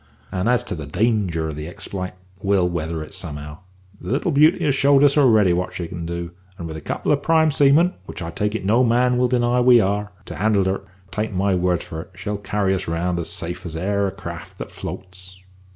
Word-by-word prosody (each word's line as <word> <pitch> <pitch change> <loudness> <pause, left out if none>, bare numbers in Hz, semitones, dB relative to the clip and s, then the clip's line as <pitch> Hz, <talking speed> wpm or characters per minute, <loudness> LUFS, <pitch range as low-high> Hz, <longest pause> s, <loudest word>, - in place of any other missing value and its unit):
And 95 +5 0
as 125 -1 +3
to - - -5
the 75 -5 -6
danger 95 -4 0
of 75 - -5
the 75 +1 -6
expl'ite, 90 +2 -6 0.3
we'll 95 -2 +2
weather 80 -2 -3
it 75 - -11
somehow. 75 0 -6 0.4
The - - -5
little 160 +6 0
beauty 150 +3 +4
has 145 - +3
showed 140 +1 +4
us 140 -1 +5
already 110 -10 +5
what 90 +1 -2
she 85 - -4
can 85 0 -6
do, 85 0 -4 0.3
and 85 - -6
with 80 - -6
a 80 - -7
couple - - -2
of 145 -1 +2
prime 160 0 +3
seamen 145 +6 +4
which - - -7
I 85 -2 -5
take 105 +5 -1
it 110 - -3
no 115 +6 +4
man 125 +1 +3
will 125 - +3
deny 125 0 +2
we 125 -1 +7
are 100 0 0
to - - -8
handle 105 -3 +2
her, 95 +1 -1 0.3
take 110 +1 -2
my 95 +1 +2
word 90 -1 +1
for 80 - -6
it, - - -13
she'll 105 +2 -4
carry 100 -1 0
us 95 - -2
round 85 +2 -1
as 85 - -2
safe 85 0 -4
as 85 -3 -6
e'er 100 +4 0
a - - -3
craft - - -9
that - - -7
floats." 95 0 -9
95 Hz, 230 wpm, -22 LUFS, 85-120 Hz, 0.4 s, we